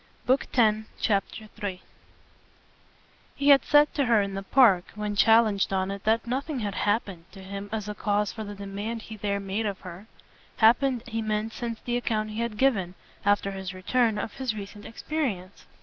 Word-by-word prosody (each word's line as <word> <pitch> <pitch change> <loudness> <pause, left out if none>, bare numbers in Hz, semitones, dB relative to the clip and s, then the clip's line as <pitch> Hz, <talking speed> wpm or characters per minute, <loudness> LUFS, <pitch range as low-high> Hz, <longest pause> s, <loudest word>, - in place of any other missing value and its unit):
Book 260 +2 +2
Tenth, 220 -3 +2
Chapter 210 +1 -1
3 200 -4 -4 1.6
He 280 +1 +1
had 275 -3 +7
said 295 0 +4
to 280 - +1
her 230 -3 +4
in 200 -1 -1
the 195 - -3
Park 195 -4 +4
when 210 -1 -3
challenged 220 -2 +4
on 190 0 0
it 200 0 -7
that 225 +2 +2
nothing 270 +4 -2
had 205 -2 -2
"happened" 200 -3 -1
to 195 -2 -11
him 200 +1 -7
as 215 -2 -3
a 210 - -3
cause 205 0 0
for 220 - -6
the 205 -1 -7
demand 200 +3 -5
he 220 - -9
there 200 -1 -2
made 200 +3 -2
of 200 -2 -5
her 185 +4 -10 0.5
happened 240 +2 +4
he 225 -2 -3
meant 215 0 -2
since 235 -2 -5
the 240 0 -1
account 215 -3 -1
he 215 - -5
had 235 -2 -2
given, 200 -9 +1 0.3
after 205 -1 +2
his 190 -1 -6
return, 225 +4 +1
of 210 0 -4
his 260 -5 -3
recent 205 0 -8
experience. 225 - -4
215 Hz, 185 wpm, -27 LUFS, 200-235 Hz, 1.6 s, had